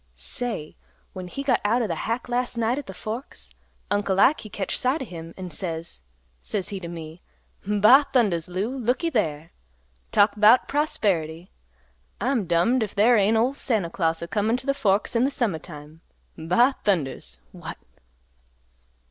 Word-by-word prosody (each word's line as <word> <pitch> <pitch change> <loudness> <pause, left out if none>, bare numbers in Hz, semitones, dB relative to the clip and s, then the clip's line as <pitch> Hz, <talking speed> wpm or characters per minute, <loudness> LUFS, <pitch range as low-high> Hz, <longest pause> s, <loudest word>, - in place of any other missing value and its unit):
Say! 155 - -4 0.4
When 185 -2 -7
he 275 +10 -5
got 260 -3 +2
out 235 +4 +2
of - - -1
th' 170 - -2
hack 230 +8 -3
last 245 0 -2
night 235 +4 +1
at 290 - -9
th' 190 - -8
Forks, 215 - -7 0.4
Uncle 200 -2 +1
Ike 290 +8 +5
he 215 - -9
catched 195 -1 -3
sight 265 +4 +1
o' - - -7
him 165 -5 -9
an' 185 -2 -7
says, 165 - -5 0.4
says 200 -4 -2
he 200 - -4
t' 175 - -7
me, 165 0 -8 0.5
'Ba 210 +8 +6
thundas! 200 - +2
Lou, 195 +8 -3
looky 260 +7 0
there! 160 - -1 0.6
Talk 205 +1 +5
'bout 215 +4 +6
prosperity. 180 - -1 0.7
I'm 240 -7 0
dummed 180 +10 +2
if 215 -2 -3
there 225 +4 +5
ain't 215 +1 +3
ol' 245 +4 +2
Santa 220 - -1
Claus 165 -2 0
a - - -5
comin' 220 +5 +1
t' 260 - -9
th' 275 0 +1
Forks 205 -2 +1
in 240 +3 +3
th' - - -2
summa 220 - -1
time. 150 0 -12 0.3
'Ba 235 +12 +2
thundas! 160 - -1
What! - - -8
205 Hz, 170 wpm, -24 LUFS, 170-245 Hz, 0.7 s, Ba